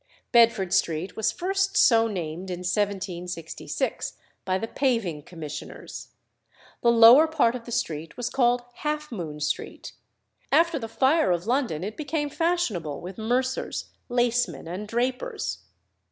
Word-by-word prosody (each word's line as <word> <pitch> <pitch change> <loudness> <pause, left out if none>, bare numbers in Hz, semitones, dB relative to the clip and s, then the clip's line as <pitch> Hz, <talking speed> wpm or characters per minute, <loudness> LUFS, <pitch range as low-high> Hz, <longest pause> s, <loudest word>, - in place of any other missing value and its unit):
Bedford 230 -6 +4
Street 165 +3 0
was 220 - +1
first 390 +2 0
so 230 -2 +5
named 180 -2 -5
in 180 0 -4
1766 180 -3 -3 0.3
by 185 0 +1
the 225 - -4
Paving 230 - 0
Commissioners. 155 -2 -8 0.7
The 235 - +5
lower 235 +7 +8
part 300 -7 +2
of 245 -2 -7
the 240 - -8
street 160 -8 -3
was 245 - -2
called 245 -2 +2
Half 300 -1 -3
Moon 160 -9 -5
Street; 150 - -3 0.6
after 335 -2 +4
the 225 - -5
fire 265 - +2
of 175 0 0
London 235 - 0
it 210 +3 -5
became 295 -1 -2
fashionable 260 - -1
with 185 +4 -8
mercers, 255 +4 -1 0.2
lacemen, 240 - 0
and 185 +5 -5
drapers. 255 - -2
225 Hz, 135 wpm, -26 LUFS, 180-260 Hz, 0.7 s, lower